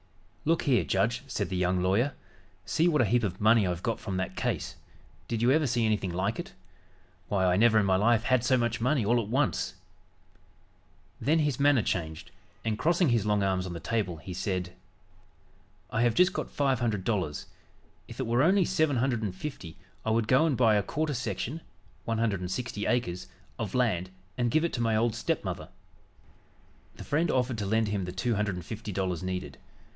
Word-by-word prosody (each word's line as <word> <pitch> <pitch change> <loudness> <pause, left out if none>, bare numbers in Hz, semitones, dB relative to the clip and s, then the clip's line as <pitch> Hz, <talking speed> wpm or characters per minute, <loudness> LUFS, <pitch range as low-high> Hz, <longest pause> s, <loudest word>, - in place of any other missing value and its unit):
"Look 165 +2 +2
here, 130 -5 +3
judge," 115 +5 0
said 130 - -2
the 95 - -3
young 90 0 +1
lawyer. 110 +10 +2 0.5
"See 165 +2 +2
what 150 -7 +3
a - - +2
heap 120 +4 +2
of 95 -3 -2
money 110 -1 +4
I've 90 0 -3
got 115 -2 -1
from 95 -3 -4
that 95 0 -3
case. - - -2 0.5
Did 115 0 -2
you 125 - +5
ever 155 +1 +3
see 120 -1 +1
anything 105 -4 0
like 95 - -1
it? 180 +3 -6 0.7
Why, 95 -1 +1
I 90 0 +3
never 110 +1 +5
in 105 - +4
my 95 -1 +3
life 110 +2 +3
had 130 -2 +2
so 130 +1 +3
much 120 -1 -1
money 130 -2 +2
all 120 +3 +3
at 105 - -6
once!" 130 -5 0 1.5
Then 155 +4 +3
his 150 -5 0
manner 140 -5 +4
changed, 80 -3 -3 0.3
and 110 -1 -1
crossing 170 0 +3
his 115 -3 +1
long 105 -1 +2
arms 95 -1 0
on 90 - -5
the 85 - -5
table 90 0 -2
he 90 +4 -8
said: 90 -1 -3 1.2
"I 115 - 0
have 120 -1 +2
got 180 +1 +3
just - - -17
five 135 -4 +2
hundred 110 -6 -1
dollars; 90 -9 -2 0.6
if - - -11
it - - -1
were 120 +2 +2
only 185 +4 +4
seven 155 -6 +1
hundred 120 -1 0
and 100 -4 -3
fifty 95 - -7 0.3
I - - -2
would 110 0 +1
go 130 +7 +4
and 140 -6 0
buy 115 -3 +4
a 105 - +3
quarter 150 +8 -2
section 125 - -3 0.4
(160 110 0 -2
acres) 115 -8 -1 0.3
of 110 -1 -3
land 100 -8 +1 0.3
and 120 -1 0
give 155 +7 +2
it 170 - -2
to 120 - -2
my 115 -1 +2
old 115 +1 +2
stepmother." - - -3 1.3
The - - -9
friend 160 +4 0
offered 125 -3 0
to 100 - -2
lend 110 +1 +1
him 100 -3 -1
the 90 - -5
two 95 +6 -1
hundred 105 -2 -1
and 90 -2 -7
fifty 110 0 -6
dollars 95 -2 -2
needed. 95 0 -5
110 Hz, 200 wpm, -28 LUFS, 95-130 Hz, 1.5 s, you